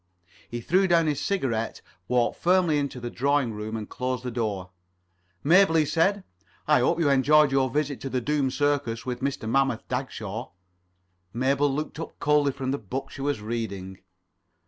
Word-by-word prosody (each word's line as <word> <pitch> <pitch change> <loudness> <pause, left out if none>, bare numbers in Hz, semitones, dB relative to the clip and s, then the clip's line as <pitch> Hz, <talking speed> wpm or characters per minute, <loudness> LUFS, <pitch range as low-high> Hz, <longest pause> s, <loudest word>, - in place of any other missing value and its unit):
He 120 0 -5
threw 185 +9 +2
down 170 -2 +4
his 150 -3 -1
cigarette, 120 - -2 0.2
walked 125 -1 +1
firmly 175 -4 +3
into 140 -3 -3
the 120 0 -5
drawing 140 -2 +1
room, 105 +1 -4
and 105 -2 -6
closed 125 -1 -3
the 125 - -4
door. 105 -6 -3 0.7
"Mabel," 170 +2 +5
he 155 -1 +4
said, 165 +7 +2
[Pg 200 - -13 0.4
31]"I 150 -2 +5
hope 125 +6 +2
you 150 - +3
enjoyed 145 +2 +5
your 135 -1 +2
visit 145 +1 -2
to 135 - -4
the 130 - 0
Doom 145 +1 0
Circus 135 -4 -1
with 125 -1 -3
Mr. 135 -4 -2
Mammoth 135 -1 +1
Dagshaw." 120 -3 -4 0.8
Mabel 140 +3 +2
looked 150 +2 -4
up 165 - -7
coldly 145 -1 +3
from 130 -1 -3
the 140 - -2
book 125 +6 -5
she 135 - -8
was 140 -5 -1
reading. 100 -4 -5
135 Hz, 175 wpm, -26 LUFS, 120-150 Hz, 0.8 s, Mabel